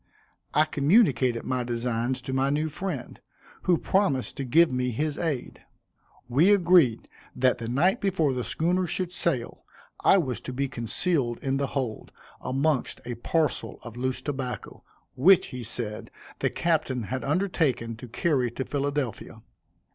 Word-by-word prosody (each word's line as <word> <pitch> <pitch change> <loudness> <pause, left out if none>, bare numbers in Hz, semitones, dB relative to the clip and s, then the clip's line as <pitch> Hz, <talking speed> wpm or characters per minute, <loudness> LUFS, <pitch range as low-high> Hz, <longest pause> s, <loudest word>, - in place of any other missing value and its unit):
I 155 - +5
communicated 140 - +3
my 125 -1 -1
designs 120 +1 -2
to 130 0 -4
my 135 +1 +2
new 150 +2 0
friend, 155 -5 -5 0.4
who 175 -2 +4
promised 190 -11 0
to 140 - -2
give 160 +6 +4
me 125 0 0
his 145 +5 -1
aid. 150 -7 -3 0.6
We 145 +11 +4
agreed 175 - +4 0.3
that 125 0 +2
the 115 - -5
night 175 - +2
before 180 -8 +1
the 125 -1 -2
schooner 180 +6 0
should 180 +1 -2
sail, 145 -9 -2 0.4
I 195 - +6
was 135 -9 -1
to 130 - -6
be 140 +2 -1
concealed 120 - -1
in 135 0 0
the 140 0 0
hold, 125 -5 -3 0.3
amongst 135 +1 0
a 120 - -3
parcel 155 +7 -1
of 120 -2 -9
loose 130 +1 -2
tobacco, 130 -7 -5 0.3
which, 185 +8 +5
he 125 -2 -6
said, 110 -2 -3 0.3
the - - +1
captain 155 -7 0
had 130 +5 -4
undertaken 145 - 0
to 125 - -9
carry 130 +1 0
to 130 +3 -5
Philadelphia. 140 -4 -3
135 Hz, 150 wpm, -26 LUFS, 125-165 Hz, 0.6 s, I